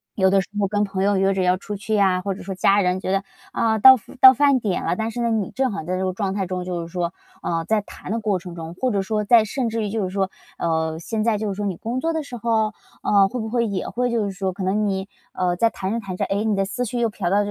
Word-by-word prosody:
有 190 -2 +3
的 195 0 +4
时 - - -10
候 200 - +2
跟 205 +1 0
朋 195 -2 -3
友 200 -1 +2
约 195 +1 +2
着 190 - -1
要 180 0 +3
出 205 +2 -6
去 215 +2 -2
呀， 190 -3 +3
或 195 0 -3
者 - - -10
说 190 +1 -5
家 195 +2 +3
人 180 0 +1
觉 185 - -3
得， 195 0 +1 0.3
啊， 220 -1 +1
到 260 +4 +10 0.3
到 260 -1 +11
饭 280 0 +3
点 200 -5 -2
了， 170 - +1
但 220 +3 -2
是 240 +2 -4
呢， 235 - +1
你 215 -4 0
正 265 -1 0
好 200 - -4
在 185 +3 -2
这 190 - -1
个 185 - -1
状 195 0 -2
态 195 - -1
中， 180 0 -3
就 180 -2 -3
是 165 - -6
说， 170 0 -2 0.3
呃， 165 -1 -2
在 215 +3 +1
弹 195 - -10
的 230 - 0
过 210 -3 0
程 180 -1 -9
中， 165 0 -8
或 255 +6 0
者 200 - +1
说 210 +2 -1
在 230 +1 +6
甚 240 +2 -2
至 225 0 -2
于 210 - -2
就 215 -1 -1
是 185 - -2
说， 195 -1 0 0.3
呃， 160 -1 -1
现 215 +5 -2
在 225 -2 +2
就 215 - -2
是 195 - -3
说 205 - -3
你 190 -4 -2
工 235 +7 -3
作 330 +4 -1
的 320 - -1
时 245 -3 -8
候， 220 -2 +1 0.3
呃， 200 -1 +4
会 245 +6 -5
不 220 -1 -4
会 235 0 +1
也 200 -4 -3
会 245 0 -1
就 230 -3 +1
是 200 - -3
说 190 -1 -3
可 190 - -6
能 205 +3 +1
你， 190 0 -2 0.3
呃， 180 -1 0
在 230 +5 +3
弹 190 0 -4
着 230 - -1
弹 195 -4 -6
着， - - 0
诶， 200 +2 -1
你 215 -2 +1
的 195 - +1
思 215 +6 -3
绪 240 +2 -3
又 230 -1 +2
嫖 190 -4 -3
到 200 - +3
200 Hz, 330 characters per minute, -22 LUFS, 185-225 Hz, 0.3 s, 到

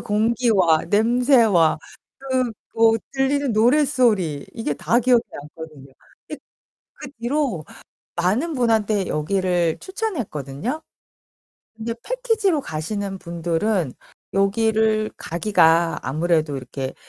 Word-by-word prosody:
공기와 210 -6 +2
냄새와 225 - +3 0.4
그 260 -2 -1 0.3
뭐 225 0 +5 0.2
들리는 275 0 0
노랫소리 230 - +2
이게 225 -10 -2
다 235 - +1
기억에 245 0 +4
남거든요. 150 -2 -11 0.4
이 - - -5
그 - - -10 0.6
그 260 - -9
뒤로 245 - -1 0.5
많은 210 - 0
분한테 220 -5 +1
여기를 175 0 0
추천했거든요. 250 - -4 1.0
근데 225 +1 -4
패키지로 445 - 0
가시는 195 +4 -4
분들은 170 - -1 0.4
여기를 215 +2 +1
가기가 170 -2 +2
아무래도 155 +2 0
이렇게 130 +1 -6
215 Hz, 240 characters per minute, -22 LUFS, 165-245 Hz, 1.0 s, 뭐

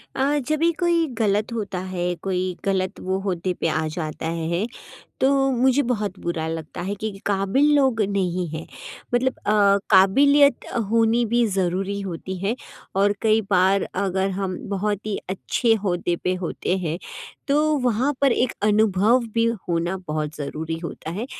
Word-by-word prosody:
अ, 280 +2 +1
जब 310 0 0
भी 335 +1 +3
कोई 340 -2 +2
गलत 210 +1 +1
होता 200 -5 -3
है, 180 -1 -2
कोई 185 +1 -2
गलत 190 0 -1
वो 190 +1 -1
औहदे 180 +1 -1
पे 165 - -2
आ 160 0 0
जाता 155 0 -4
है, 170 +5 -1 0.6
तो 265 - +4 0.2
मुझे 260 +3 +3
बहुत 210 -6 -2
बुरा 170 -2 -2
लगता 160 0 -5
है 195 +3 -2
कि 215 +2 -4 0.2
काबिल 205 +9 +2
लोग 260 -6 +3
नहीं 185 -3 -1
हैं। 160 +1 -6 0.5
मतलब 260 +1 +2
अ, 210 - +3 0.4
काबिलियत 280 +8 +5 0.2
होनी 230 +1 +3
भी 235 +2 +2
ज़रूरी 195 0 -1
होती 190 0 -5
है 200 +6 -1 0.4
और 200 +1 +4
कई 220 0 +4
बार 190 +1 +4
अगर 190 0 0
हम 190 -2 -2
बहुत 205 +1 -2
ही 210 - -1
अच्छे 225 +4 +1
औहदे 175 -4 -1
पे 185 - +1
होते 180 +2 -1
हैं, 170 -2 -3 0.5
तो 300 +2 +3
वहाँ 250 +6 +1
पर 275 -2 +4
एक 245 0 +1
अनुभव 210 +2 +3
भी 230 0 +3 0.2
होना 170 +2 0
बहुत 155 0 -2
ज़रूरी 160 +3 -4
होता 165 -1 -7
है। 210 +8 -4
195 Hz, 160 wpm, -23 LUFS, 180-230 Hz, 0.6 s, काबिलियत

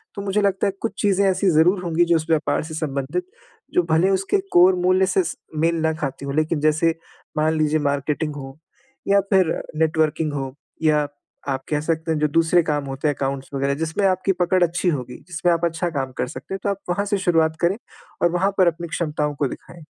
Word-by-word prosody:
तो 200 - -4
मुझे 200 +1 0
लगता 200 -1 +1
है 195 - -1
कुछ 230 - -2
चीज़ें 200 -1 +3
ऐसी 190 +1 +2
ज़रूर 175 +4 +4
होंगी 170 0 +2
जो 170 0 +3
उस 160 -1 0
व्यापार 160 -1 +1
से 160 0 -8
संबंधित 150 - -2 0.5
जो 180 - +3
भले 165 +4 +4
उसके 195 - +1 0.2
कोर 180 +2 +6
मूल्य 185 +1 +3
से 190 +1 +2 0.4
मेल 165 +2 +2
ना 160 0 +1
खाती 140 -3 -5
हो 140 - -3
लेकिन 155 +2 0
जैसे 160 +2 +2 0.4
मान 155 +1 +2
लीजिए 155 0 +2
मार्केटिंग 145 +1 -1
हो 135 -1 -8 0.5
या 200 0 +5
फिर 185 -4 +4 0.3
नेटवर्किंग 155 -1 +1
हो 135 -2 -4 0.3
या 150 -2 +3 0.4
आप 135 0 -2
कह 150 - +1
सकते 160 +1 -1
हैं, 160 - +1
जो 150 - +2
दूसरे 165 +3 +3
काम 145 -3 -1
होते 135 +2 -3
हैं 145 - +1
अकाउंट्स 135 0 -3
वग़ैरह 140 0 0
जिसमें 160 +5 -1
आपकी 185 +1 +1
पकड़ 180 0 +2
अच्छी 175 +1 +1
होगी, 125 -6 -3
जिसमें 175 -1 0
आप 170 0 0
अच्छा 170 +1 -1
काम 135 -5 -3
कर - - -1
सकते 150 - -8
हैं 195 - -3
तो - - 0
आप 200 - -1
वहाँ 200 +3 0
से 205 0 0
शुरुआत 165 -4 +2
करें 175 +4 +2 0.4
और 175 - +3
वहाँ 185 +3 +1
पर 185 - +5
अपनी 170 0 -1
क्षमताओं 150 -2 -2
को 140 -1 0
दिखाएँ। 170 +6 -10
160 Hz, 215 wpm, -22 LUFS, 150-180 Hz, 0.5 s, कोर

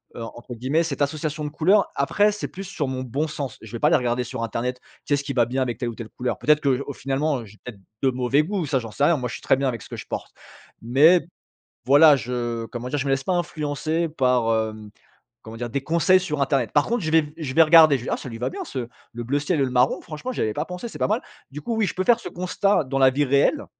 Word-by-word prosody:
heu, 115 - -7
entre 120 +2 -9
guillemets, 135 +8 0
cette 160 - -4
«association 150 +1 -2
de - - -3
couleurs». 185 +7 +3
Après 205 +9 +2
c'est 210 - -5
plus 195 +1 -8
sur 155 -7 -3
mon 130 -1 -3
bon 140 +6 -2
sens. 140 -5 -5
Je 110 - -11
vais - - -12
aller 165 +2 +5
regarder 125 -2 0
sur 115 - -5
Internet, 125 +2 -3 0.3
qu'est-ce 145 -1 0
qui 140 -1 -4
va 120 -2 +3
bien 130 +3 -2
avec 120 -2 -2
telle 120 -2 -2
ou 115 - -7
telle 115 -2 -8
couleur? 125 -1 -3
Peut-être 150 0 +3
que 135 -2 +2
j - - -5
au 140 - -5
finalement, 135 +2 -1
heu, - - -10
j'ai 105 +1 -16
peut-être 110 -5 -9 0.2
de 135 - +4
mauvais 130 +4 +1
goûts, 190 -1 -2
ça 135 -2 0
j'en 115 -2 -8
sais 140 - +1
rien. 170 - +4
Moi 125 -2 -3
je - - -7
suis - - -10
très - - +3
bien 135 -1 0
avec 115 -4 -5
ce - - -13
que - - -6
je - - -8
porte. - - -6 0.5
Mais, 150 +10 +5 0.6
voilà 145 +2 +7
je 120 -2 -3
comment 120 +1 -6
dire? 145 - -1
Je 135 - -2
me - - -1
laisse 135 0 0
pas 185 - +1
influencer, 160 -1 -1
par, 125 -6 +1 0.2
hem 110 -1 -11 0.5
comment 110 +1 -10
dire? 120 -1 -4
Des 140 +2 -2
conseils 170 +5 +3
sur 150 -6 -3
internet. 135 -5 0
Par 145 - +3
contre, 235 -2 -1
je 155 - -1
vais 150 -2 +3
je 150 -5 -5
vais 165 - +7
regarder, 155 -3 +7
je 120 - -9
vais - - -4
«Ah - - +1
ça - - -8
lui 115 - -7
va 125 +2 -1
bien - - -6
ce 125 -4 -5 0.3
le 120 - -5
bleu 140 +4 0
ciel 150 0 0
et - - +3
le 130 - -2
marron, 125 +2 +2
franchement, 170 +11 -6
j'y - - -5
avais 110 -1 -1
pas 150 - -2
pensé, 180 +6 -6
c'est - - -10
pas - - +1
mal». 220 +4 +1 0.3
Du 150 - -6
coup, 230 -2 -2
oui, 215 -2 +2
je - - -4
peux 185 - -1
faire 235 +2 +4
ce - - -6
constat, 185 0 0
dans 135 +1 -2
la 130 -1 +6
vie 145 +3 +1
réelle, 140 +1 +2
140 Hz, 285 wpm, -23 LUFS, 125-160 Hz, 0.6 s, voilà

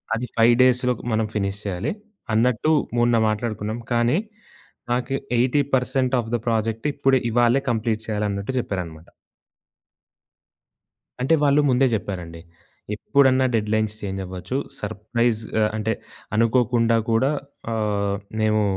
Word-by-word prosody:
అది 125 +2 -3
5 115 +1 +6
డేస్‌లో 125 0 +3 0.2
మనం 110 0 +1
ఫినిష్ 100 0 -2
చేయాలి 100 +8 -2 0.4
అన్నట్టు 125 +6 +2 0.3
మొన్న 120 0 +3
మాట్లాడుకున్నాం. 110 0 -3
కానీ, 120 +6 +2 0.7
నాకు 125 +2 0 0.2
80% 130 0 +1
ఆఫ్ 115 +1 -9
ద 120 - -1
ప్రాజెక్ట్ 115 +3 -1
ఇప్పుడే, 135 -2 +3
ఇవాళే 120 +3 +3
కంప్లీట్ 110 -1 -1
చేయాలి" 105 -1 -1
అన్నట్టు 100 +6 -3
చెప్పారన్నమాట. 85 -7 -5 2.1
అంటే 135 +6 +2
వాళ్ళు 145 +1 +4
ముందే 130 +1 +4
జెప్పారండి. 90 -6 -4 0.5
ఎప్పుడన్నా 130 +1 +3
డెడ్‌లైన్స్ 110 0 0
చేంజవ్వచ్చు. 95 +3 -5 0.2
సర్‌ప్రైజ్ 110 +2 -1 0.2
ఆహ్, 105 - +3
అంటే 110 +1 -1 0.4
అనుకోకుండా 115 0 +3
కూడా 130 +6 +3 0.4
ఆహ్, 100 -2 0 0.3
మేము 110 0 +2
115 Hz, 110 wpm, -23 LUFS, 105-125 Hz, 2.1 s, 5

